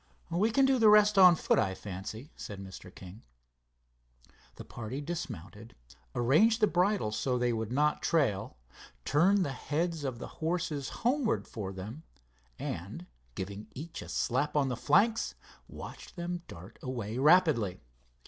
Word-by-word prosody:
"We 190 Hz, +7 st, +2 dB
can 270 Hz, +4 st, +4 dB
do 265 Hz, -1 st, +3 dB
the 220 Hz, -2 st, +7 dB
rest 210 Hz, -1 st, +6 dB
on 180 Hz, -2 st, +9 dB
foot, -, -, +2 dB
I 95 Hz, 0 st, 0 dB
fancy," 105 Hz, -, -7 dB
said 100 Hz, -2 st, -8 dB
Mr. 95 Hz, -1 st, -10 dB
King. 95 Hz, +4 st, -11 dB, 1.3 s
The -, -, -10 dB
party 120 Hz, +4 st, -6 dB
dismounted, 115 Hz, -, -7 dB, 0.4 s
arranged 190 Hz, -, +4 dB
the 215 Hz, -, +5 dB
bridles 180 Hz, -, +1 dB
so 125 Hz, +4 st, 0 dB
they 120 Hz, -1 st, +1 dB
would 110 Hz, 0 st, -3 dB
not 150 Hz, +3 st, +1 dB
trail, 110 Hz, -, 0 dB, 0.5 s
turned 185 Hz, +6 st, +3 dB
the 140 Hz, -, -3 dB
heads 155 Hz, +4 st, -2 dB
of 130 Hz, -4 st, -3 dB
the -, -, -7 dB, 0.2 s
horses 160 Hz, -4 st, -1 dB, 0.2 s
homewards 255 Hz, -1 st, +1 dB
for 100 Hz, -4 st, -5 dB
them, 100 Hz, +10 st, -8 dB, 0.6 s
and, -, -, -6 dB, 0.3 s
giving 100 Hz, +2 st, -6 dB
each 160 Hz, +5 st, -7 dB
a -, -, -9 dB
slap 140 Hz, +5 st, 0 dB
on 140 Hz, -2 st, +2 dB
the 125 Hz, -, -1 dB
flanks, 220 Hz, -, +2 dB, 0.3 s
watched -, -, -10 dB
them 175 Hz, 0 st, -4 dB
dart 85 Hz, +3 st, -12 dB
away, 120 Hz, -3 st, -4 dB
rapidly. 145 Hz, -, +4 dB
140 Hz, 150 wpm, -30 LUFS, 110-180 Hz, 1.3 s, on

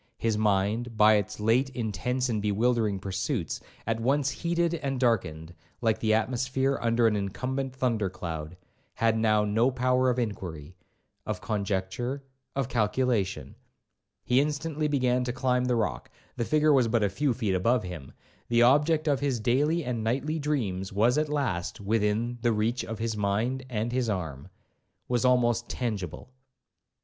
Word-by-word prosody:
His 115 Hz, -1 st, 0 dB
mind, 105 Hz, +3 st, 0 dB
by 110 Hz, 0 st, +7 dB
its 100 Hz, 0 st, -3 dB
late 115 Hz, +5 st, +2 dB
intense 125 Hz, +3 st, -1 dB
and 110 Hz, -4 st, -1 dB
bewildering 105 Hz, 0 st, +1 dB
pursuits, 95 Hz, -, -3 dB, 0.3 s
at 115 Hz, 0 st, -1 dB
once 135 Hz, +4 st, +1 dB
heated 170 Hz, 0 st, 0 dB
and 140 Hz, -5 st, -2 dB
darkened, 85 Hz, -10 st, 0 dB, 0.3 s
like 110 Hz, -2 st, +1 dB
the 110 Hz, -, +1 dB
atmosphere 130 Hz, +4 st, 0 dB
under 115 Hz, 0 st, +2 dB
an 110 Hz, -2 st, +3 dB
incumbent 130 Hz, +7 st, -3 dB
thunder 115 Hz, -6 st, 0 dB
cloud, 85 Hz, -2 st, -6 dB, 0.4 s
had 115 Hz, -1 st, +2 dB
now 110 Hz, -1 st, +3 dB
no 110 Hz, +5 st, +2 dB
power 130 Hz, 0 st, +2 dB
of 125 Hz, -, 0 dB
inquiry, 90 Hz, -8 st, -4 dB, 0.5 s
of 105 Hz, -4 st, -3 dB
conjecture, 100 Hz, +3 st, -2 dB
or 140 Hz, 0 st, -9 dB, 0.3 s
of 135 Hz, -3 st, 0 dB
calculation. 105 Hz, -, 0 dB, 0.7 s
He 125 Hz, +2 st, +3 dB
instantly 150 Hz, +1 st, -1 dB
began 125 Hz, -3 st, +1 dB
to 125 Hz, -, -2 dB
climb 125 Hz, 0 st, +1 dB
the 125 Hz, -1 st, +1 dB
rock,—the 110 Hz, -, -4 dB
figure 155 Hz, +2 st, +3 dB
was 130 Hz, -4 st, +4 dB
but 115 Hz, -1 st, +1 dB
a -, -, +4 dB
few 135 Hz, +8 st, 0 dB
feet 110 Hz, -5 st, -1 dB
above 115 Hz, +6 st, +2 dB
him,—the 90 Hz, -, -4 dB
object 150 Hz, +5 st, +4 dB
of 140 Hz, -3 st, +2 dB
his 135 Hz, -4 st, 0 dB
daily 145 Hz, +8 st, +1 dB
and 120 Hz, -3 st, -2 dB
nightly 140 Hz, +8 st, -1 dB
dreams 110 Hz, -11 st, -2 dB
was 115 Hz, +8 st, +3 dB
at 155 Hz, -1 st, -1 dB
last 135 Hz, -13 st, -2 dB
within 110 Hz, +3 st, 0 dB
the 120 Hz, 0 st, +2 dB
reach 115 Hz, +3 st, 0 dB
of 115 Hz, -, -5 dB
his 115 Hz, 0 st, -2 dB
mind 110 Hz, +6 st, -1 dB
and 115 Hz, 0 st, -2 dB
his 125 Hz, -2 st, 0 dB
arm,—was 90 Hz, -, -5 dB
almost 120 Hz, -2 st, +2 dB
tangible. 105 Hz, -4 st, -4 dB
115 Hz, 155 wpm, -28 LUFS, 105-130 Hz, 0.7 s, by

